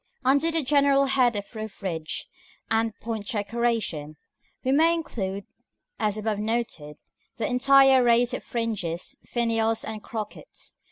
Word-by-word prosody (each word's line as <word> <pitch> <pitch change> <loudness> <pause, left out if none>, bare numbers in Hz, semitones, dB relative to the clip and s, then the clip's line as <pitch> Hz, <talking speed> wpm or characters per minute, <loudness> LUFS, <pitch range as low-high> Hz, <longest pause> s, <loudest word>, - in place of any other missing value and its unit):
§ - - -48 0.2
VIII. 255 - +2
Under 285 +4 +3
the 325 -1 0
general 280 0 +4
head 260 -4 +3
of 205 +2 -5
roof 215 -1 -7
ridge 160 -4 -3 0.5
and 225 -1 0
point 220 -2 -4
decoration, 210 - -2 0.5
we 260 - +1
may 325 +4 +4
include, 200 - -4 0.5
as 215 -1 0
above 215 -1 -2
noted, 210 -10 -3 0.4
the 225 - -2
entire 265 +1 +5
race 240 +1 +3
of - - -4
fringes, 220 -3 -3
finials, 225 -1 0
and 215 -1 -6
crockets. 215 -1 -8
230 Hz, 145 wpm, -26 LUFS, 210-255 Hz, 0.5 s, entire